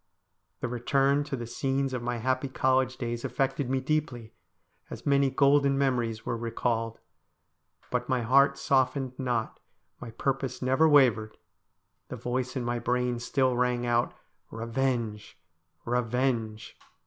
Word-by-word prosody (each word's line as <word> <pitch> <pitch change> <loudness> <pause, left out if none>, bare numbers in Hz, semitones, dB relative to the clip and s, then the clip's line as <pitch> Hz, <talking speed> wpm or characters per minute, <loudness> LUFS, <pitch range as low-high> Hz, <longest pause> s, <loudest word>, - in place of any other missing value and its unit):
The - - -1
return 135 +4 +1
to 140 - -3
the 120 -2 -5
scenes 135 +3 -1
of 125 - -2
my 120 0 -2
happy 130 +4 -1
college 130 0 +1
days 120 -1 -4
affected 135 -1 -1
me 135 0 +1
deeply, 130 -5 -2 0.6
as - - -9
many 140 -1 +3
golden 140 +1 +3
memories 120 -5 0
were - - -1
re 115 0 -4
called. 115 -1 -1 0.9
But 125 0 -1
my 125 -2 +1
heart 140 +3 +4
softened 130 -2 +1
not, 120 -4 -2 0.4
my 120 - -8
purpose 135 +3 -2
never 135 +5 +3
wavered; 115 -7 +4 0.7
the - - -6
voice 125 +1 -3
in 125 -2 -2
my 120 0 -1
brain 125 0 0
still 130 +1 +1
rang 125 0 +1
out 120 0 +1 0.2
' - - -43
Bevenge! 115 -3 -2 0.5
revenge 120 -2 -1
125 Hz, 140 wpm, -28 LUFS, 120-135 Hz, 0.9 s, heart